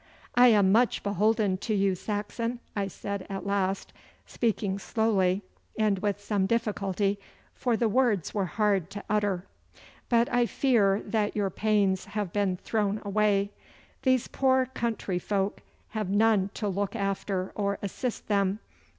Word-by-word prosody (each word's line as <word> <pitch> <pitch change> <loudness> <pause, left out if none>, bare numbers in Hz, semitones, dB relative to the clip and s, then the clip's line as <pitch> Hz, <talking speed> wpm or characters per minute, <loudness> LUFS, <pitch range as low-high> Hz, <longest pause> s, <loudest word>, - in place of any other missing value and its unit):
'I 245 +1 +7
am 205 -5 +5
much 235 +3 +3
beholden 205 0 +2
to 215 +3 -2
you, 195 -1 +2
Saxon,' 215 +5 -3 0.2
I 200 -2 0
said 200 0 -5
at 195 0 -5
last, 195 -1 -1 0.3
speaking 205 -4 -1
slowly 200 -3 +1 0.3
and 210 -3 +2
with 205 0 -1
some 205 -2 0
difficulty, 200 -3 0 0.3
for 240 -3 0
the 235 - +2
words 220 - +1
were 200 -3 0
hard 200 -3 +1
to 200 +1 -7
utter. 205 -3 0 0.6
'But 235 0 +4
I 245 -1 +3
fear 215 -8 +2
that 215 -2 0
your 200 -2 0
pains 200 -2 +1
have 200 -2 -4
been 200 -3 +1
thrown 210 +1 -1
away. 200 -1 +2 0.5
These 260 -2 +2
poor 260 -1 +2
country 230 -7 -2
folk 200 +1 -1 0.3
have 215 -3 -3
none 205 -1 +3
to 210 - -2
look 200 +3 -2
after 195 -2 -2
or 200 -1 -1
assist 230 +5 -4
them. 200 -1 +1
205 Hz, 145 wpm, -28 LUFS, 195-220 Hz, 0.6 s, I